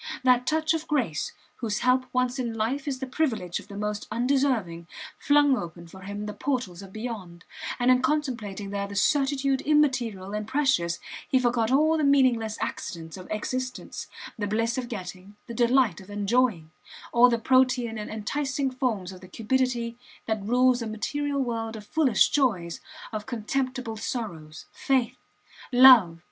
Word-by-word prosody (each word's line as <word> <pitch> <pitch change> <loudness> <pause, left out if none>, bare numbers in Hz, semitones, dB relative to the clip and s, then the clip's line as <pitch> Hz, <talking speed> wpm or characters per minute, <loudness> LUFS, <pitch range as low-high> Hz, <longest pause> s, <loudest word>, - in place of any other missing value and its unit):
That 250 -1 +4
touch 315 0 +2
of 325 0 -3
grace, 245 - -1 0.3
whose 215 -3 -2
help 255 +1 +2
once 250 +1 0
in 235 -3 -2
life 255 +7 -2
is 275 -2 -1
the 265 - -4
privilege 245 - -1
of - - -14
the 200 -1 -9
most 210 0 -3
undeserving, 235 -8 0 0.3
flung 290 -1 +4
open 170 -4 -6
for 190 +3 -13
him 205 +2 -6
the 210 - -5
portals 240 -11 -3
of 195 -1 -11
beyond, 200 -6 -7 0.3
and 245 +1 +3
in 255 0 +4
contemplating 235 -9 -2
there 200 0 -2
the 200 - -8
certitude 275 +3 +2
immaterial 250 -10 +1
and 210 0 -3
precious 260 -11 +1 0.3
he 260 - +4
forgot 240 -3 +1
all 310 +4 +3
the - - +1
meaningless 255 -6 +3
accidents 165 -1 -5
of 185 -1 -10
existence: 255 +4 -4 0.3
the 205 - -1
bliss 225 +3 0
of 250 -2 -4
getting, 195 -2 -8
the 235 - -8
delight 240 -5 +2
of 190 - -15
enjoying; 205 -5 0 0.4
all 245 +1 +7
the 235 - +1
protean 250 -2 +2
and 210 - -6
enticing 265 +5 -2
forms 235 -8 -2
of 185 -1 -12
the 185 - -12
cupidity 235 +2 -1 0.3
that 220 -2 -1
rules 250 +4 +3
a 230 - -3
material 280 +6 -2
world 225 -2 -3
of 210 -1 -9
foolish 265 -5 +3
joys, 195 - 0 0.3
of 215 0 -5
contemptible 255 0 -3
sorrows. 170 -10 -5
Faith! 260 -4 0 0.5
Love! 245 -10 +8
235 Hz, 160 wpm, -26 LUFS, 205-260 Hz, 0.5 s, Love